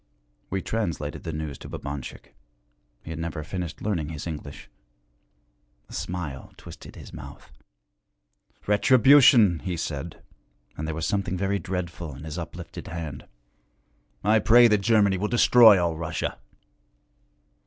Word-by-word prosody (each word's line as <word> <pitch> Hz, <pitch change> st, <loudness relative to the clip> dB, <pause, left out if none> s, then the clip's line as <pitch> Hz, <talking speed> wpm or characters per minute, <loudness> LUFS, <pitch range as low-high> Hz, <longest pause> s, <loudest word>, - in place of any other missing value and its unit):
We 95 Hz, 0 st, -2 dB
translated 85 Hz, -10 st, -3 dB
the 80 Hz, -, -5 dB
news 75 Hz, -3 st, -5 dB
to -, -, -10 dB
Babanchik 70 Hz, -1 st, -7 dB, 0.7 s
he 80 Hz, -, -8 dB
had 80 Hz, -, -6 dB
never 80 Hz, -1 st, -4 dB
finished 85 Hz, -2 st, -6 dB
learning 85 Hz, -8 st, -1 dB
his 80 Hz, -3 st, -6 dB
English. 75 Hz, -4 st, -7 dB, 1.2 s
A -, -, -12 dB
smile 80 Hz, -7 st, -5 dB
twisted -, -, -12 dB
his -, -, -12 dB
mouth. -, -, -11 dB, 1.1 s
'Retribution!' 120 Hz, -, +6 dB
he 90 Hz, -3 st, -4 dB
said; 80 Hz, 0 st, -5 dB, 0.5 s
and 80 Hz, -, -5 dB
there 80 Hz, -, -3 dB
was 80 Hz, 0 st, -3 dB
something 100 Hz, -3 st, -1 dB
very 100 Hz, +2 st, 0 dB
dreadful 85 Hz, -5 st, -5 dB
in 70 Hz, -, -11 dB
his 80 Hz, +2 st, -6 dB
uplifted 85 Hz, -, -8 dB
hand. 80 Hz, -4 st, -7 dB, 1.0 s
'I 110 Hz, +2 st, +4 dB
pray 120 Hz, +3 st, +6 dB
that 105 Hz, -1 st, +3 dB
Germany 100 Hz, -3 st, +3 dB
will 105 Hz, -, 0 dB
destroy 115 Hz, -3 st, +7 dB
all 85 Hz, -2 st, 0 dB
Russia.' 80 Hz, -1 st, -4 dB
85 Hz, 130 wpm, -25 LUFS, 80-105 Hz, 1.2 s, destroy